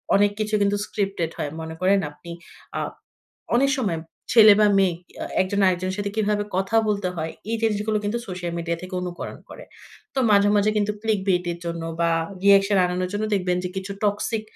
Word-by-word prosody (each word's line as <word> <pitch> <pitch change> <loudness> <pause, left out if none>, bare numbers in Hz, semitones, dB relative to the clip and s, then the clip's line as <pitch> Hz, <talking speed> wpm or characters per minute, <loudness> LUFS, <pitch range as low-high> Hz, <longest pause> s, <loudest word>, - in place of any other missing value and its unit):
অনেক 205 +1 +4
কিছু 215 0 0
কিন্তু 200 0 +2
স্ক্রিপ্টেড 195 -6 -2
হয়। 145 - -2
মনে 160 0 -6
করেন 195 +2 +4
আপনি 170 +3 -12 0.5
আ - - -1 0.8
অনেক 275 +3 +4
সময় 195 -10 0 0.3
ছেলে 215 -3 +9
বা 210 - +6
মেয়ে 190 -3 +3 0.3
এ - - -2 0.2
একজন 200 +2 -1
আরেকজনের 185 +1 0
সাথে 205 0 -2
কিভাবে 210 -1 +1
কথা 195 +4 0
বলতে 200 -3 0
হয় 160 0 -3 0.2
এই 230 - +1
জিনিসগুলো 215 0 +1
কিন্তু 210 +3 -1
সোশ্যাল 175 -2 -5
মিডিয়া 170 0 -2
থেকে 185 0 -7
অনুকরণ 175 -1 -6
করে। - - -10 0.5
তো - - -2
মাঝে, 200 0 +5
মাঝে 205 +1 +3
কিন্তু 210 0 +1
ক্লিক 220 -3 +1
বেট 180 -1 +2
এর 170 - -8
জন্য 170 0 -4 0.2
বা 170 0 +3 0.3
রিঅ্যাকশন 200 0 +5
আনানোর 180 0 -1
জন্য 205 +1 -1
দেখবেন 180 -2 0
যে - - -1
কিছু 190 +1 -4
টক্সিক 210 +2 0
200 Hz, 190 wpm, -23 LUFS, 180-210 Hz, 0.8 s, ছেলে